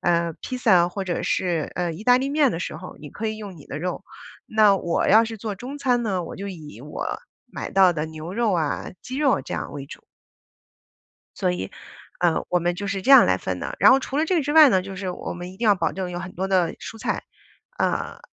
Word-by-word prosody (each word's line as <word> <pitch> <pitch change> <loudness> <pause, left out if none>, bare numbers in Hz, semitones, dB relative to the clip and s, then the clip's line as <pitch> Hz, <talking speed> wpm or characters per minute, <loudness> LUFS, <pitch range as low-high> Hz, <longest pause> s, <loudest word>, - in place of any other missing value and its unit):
呃， 170 -1 +1
披 255 - -4
萨 185 -8 +4
或 195 +2 -5
者 180 -2 -2
是， 170 -4 -1
呃， 175 -1 -1
意 185 - -9
大 250 +1 +6
利 270 +1 -1
面 285 -2 +3
的 165 - -3
时 165 - -4
候， 180 +3 -10
你 150 - -9
可 220 +9 -4
以 215 - -4
用 200 -4 -8
你 145 - -14
的 140 - -5
肉。 180 +3 -4 0.4
那 215 -2 +4
我 170 -3 0
要 220 +3 +7
是 225 0 -6
做 210 0 -4
中 255 +8 -8
餐 245 -3 +1
呢， 190 -5 -1
我 - - -8
就 200 +1 -5
以 155 - -9
我 150 - -5 0.4
买 - - -6
到 190 -2 +5
的 155 -2 -2
牛 160 +4 -8
肉 230 -3 +1
啊、 160 -4 -1
鸡 255 - -7
肉 275 -6 +2
这 - - -6
样 - - -5
为 140 -1 -7
主。 - - -11 1.4
所 - - +1
以， 90 - -2 0.6
呃， 175 -2 +1
我 180 - +2
们 175 +1 0
就 200 - -5
是 200 -1 -2
这 260 - -3
样 270 - +10
来 - - +2
分 - - -4
的， - - -5
然 - - +8
后 270 - +6
除 270 +1 -4
了 310 - +2
这 345 -1 +1
之 290 +1 -2
外 310 -2 +9
呢， 190 -5 +3
就 195 +1 -8
是 185 -1 -4
我 - - -5
们 175 +1 -7
一 190 - -15
定 230 - -2
要 210 - +6
保 175 -3 0
证 185 -1 -4
有 175 - -4
很 185 0 -7
多 190 +2 -2
的 185 -3 +2
蔬 225 - -9
菜， - - -2 0.5
呃， - - -1
190 Hz, 265 characters per minute, -23 LUFS, 175-230 Hz, 1.4 s, 样